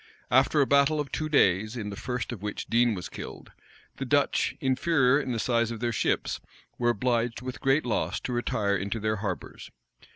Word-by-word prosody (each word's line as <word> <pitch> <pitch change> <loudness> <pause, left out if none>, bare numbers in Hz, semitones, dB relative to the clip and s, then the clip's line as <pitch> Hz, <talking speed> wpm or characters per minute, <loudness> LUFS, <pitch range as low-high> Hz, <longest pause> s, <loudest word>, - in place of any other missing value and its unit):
After 135 +4 +4
a - - +4
battle 140 +3 +3
of 145 -2 -3
two 155 -1 -2
days, 110 -4 +3
in 105 -3 -4
the - - -6
first 125 +4 -4
of 115 -6 -7
which 105 0 -4
Dean 120 -1 +2
was 90 - -5
killed, - - -9 0.5
the - - -3
Dutch, - - +1
inferior 135 0 +3
in 130 - -4
the 120 - -1
size 115 0 +1
of 115 -2 -5
their 120 +1 -1
ships, 115 - -1 0.4
were 120 -1 +2
obliged, 120 +1 0
with 130 +2 -6
great 135 +2 +2
loss, 105 -4 -1
to 125 - -4
retire 105 -4 0
into 100 +3 -2
their 110 0 -1
harbors. 100 -4 -5
120 Hz, 195 wpm, -27 LUFS, 110-130 Hz, 0.5 s, After